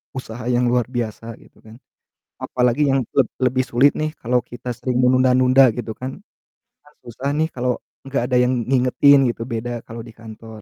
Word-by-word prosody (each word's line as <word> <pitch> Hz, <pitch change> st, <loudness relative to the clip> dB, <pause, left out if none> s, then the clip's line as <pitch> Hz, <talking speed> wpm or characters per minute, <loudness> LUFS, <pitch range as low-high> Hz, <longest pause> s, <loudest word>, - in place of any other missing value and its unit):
usaha 120 Hz, -2 st, -7 dB
yang 125 Hz, 0 st, +1 dB
luar 125 Hz, -2 st, +1 dB
biasa, 115 Hz, -2 st, -5 dB
gitu -, -, -22 dB
kan. 110 Hz, 0 st, -13 dB, 0.7 s
Apalagi 125 Hz, +3 st, +1 dB
yang 135 Hz, -, +2 dB, 0.2 s
leb 130 Hz, -5 st, +3 dB
lebih 130 Hz, 0 st, +1 dB
sulit 130 Hz, +4 st, +3 dB
nih 155 Hz, 0 st, -1 dB
kalo 125 Hz, 0 st, 0 dB
kita 120 Hz, 0 st, -6 dB
sering 125 Hz, 0 st, -2 dB
menunda-nunda, 130 Hz, 0 st, +4 dB
gitu 115 Hz, -1 st, -6 dB
kan. 130 Hz, +1 st, -7 dB, 0.7 s
Kan 150 Hz, -, -22 dB
susah 125 Hz, +4 st, -5 dB
nih 155 Hz, +2 st, +1 dB
kalo 125 Hz, -1 st, -1 dB, 0.3 s
gak 135 Hz, -3 st, -2 dB
ada 125 Hz, -, +2 dB
yang 125 Hz, +1 st, +1 dB
ngingetin 135 Hz, +2 st, +4 dB
gitu, 115 Hz, -, -12 dB
beda 115 Hz, 0 st, -4 dB, 0.2 s
kalo 115 Hz, 0 st, -8 dB
di 115 Hz, -, -12 dB
kantor, 110 Hz, -1 st, -12 dB
125 Hz, 175 wpm, -20 LUFS, 120-130 Hz, 0.7 s, menunda-nunda